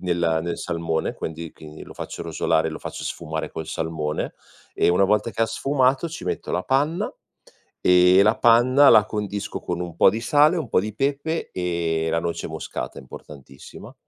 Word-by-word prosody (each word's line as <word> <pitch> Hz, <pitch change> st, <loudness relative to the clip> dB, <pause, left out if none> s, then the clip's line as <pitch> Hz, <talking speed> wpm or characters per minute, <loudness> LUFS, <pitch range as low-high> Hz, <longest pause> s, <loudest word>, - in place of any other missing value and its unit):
nella 85 Hz, -3 st, 0 dB
nel 85 Hz, 0 st, -4 dB
salmone, 80 Hz, -1 st, -2 dB
quendi 80 Hz, 0 st, -6 dB
quindi 75 Hz, 0 st, -12 dB
lo -, -, -13 dB
faccio -, -, -7 dB
rosolare, 80 Hz, -1 st, 0 dB
e -, -, -5 dB
lo 80 Hz, -, -7 dB
faccio -, -, -7 dB
sfumare 80 Hz, -1 st, -4 dB
col 80 Hz, -1 st, -6 dB
salmone, 80 Hz, -1 st, -3 dB, 0.4 s
e -, -, +2 dB
una 90 Hz, +3 st, +4 dB
volta 105 Hz, +3 st, +1 dB
che 110 Hz, -, -7 dB
ha 115 Hz, -, +2 dB
sfumato, 135 Hz, +3 st, +1 dB
ci 165 Hz, -, -8 dB
metto -, -, -3 dB
la -, -, -1 dB
panna, 145 Hz, +6 st, 0 dB, 0.7 s
e 90 Hz, +1 st, +6 dB
la 105 Hz, +2 st, +3 dB
panna 130 Hz, +4 st, +6 dB
la 110 Hz, -2 st, +6 dB
condisco 105 Hz, -2 st, -4 dB
con 90 Hz, 0 st, -3 dB
un 85 Hz, -2 st, -6 dB
po' -, -, +6 dB
di 110 Hz, -, -3 dB
sale, 150 Hz, +7 st, +4 dB
un 150 Hz, -8 st, -4 dB
po' -, -, +3 dB
di 105 Hz, +2 st, -4 dB
pepe 145 Hz, +5 st, -2 dB
e 85 Hz, -2 st, -1 dB
la 85 Hz, -, +1 dB
noce 85 Hz, 0 st, -4 dB
moscata, -, -, -6 dB
importantissima 65 Hz, +1 st, -12 dB
90 Hz, 185 wpm, -23 LUFS, 80-120 Hz, 0.7 s, e